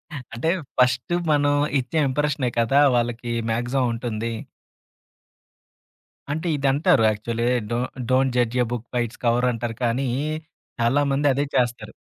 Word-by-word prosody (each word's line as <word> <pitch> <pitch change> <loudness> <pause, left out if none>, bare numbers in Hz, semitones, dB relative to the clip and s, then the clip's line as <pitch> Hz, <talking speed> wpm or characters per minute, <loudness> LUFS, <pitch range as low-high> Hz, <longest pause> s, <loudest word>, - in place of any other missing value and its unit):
ఆ! - - -4 0.2
అంటే 120 +8 -1 0.3
ఫస్టు 125 +6 +2 0.2
మనం 145 -1 +3 0.3
ఇచ్చే 130 +5 -3
ఇంప్రెషనే 145 -1 0
కదా 115 +5 +3 0.2
వాళ్ళకి 120 0 -2 0.2
మాక్సిమం 120 +3 0
ఉంటుంది. 115 -1 -3 2.0
అంటే 160 +4 -2
ఇదంటారు 135 -4 +3
actually 115 +2 -2 0.3
do 115 - 0 0.3
don't 130 0 +3
judge 120 0 +1
a - - -2
book 120 -1 -4
by 125 - +1
its 115 - -16
cover 120 +1 +3
అంటారు 115 -1 -4
కానీ 120 +3 0 0.7
చాలా 120 +5 +3
మంది 140 +2 +2
అదే 140 +2 0
చేస్తారు. 120 -2 0
125 Hz, 135 wpm, -23 LUFS, 115-135 Hz, 2.0 s, మనం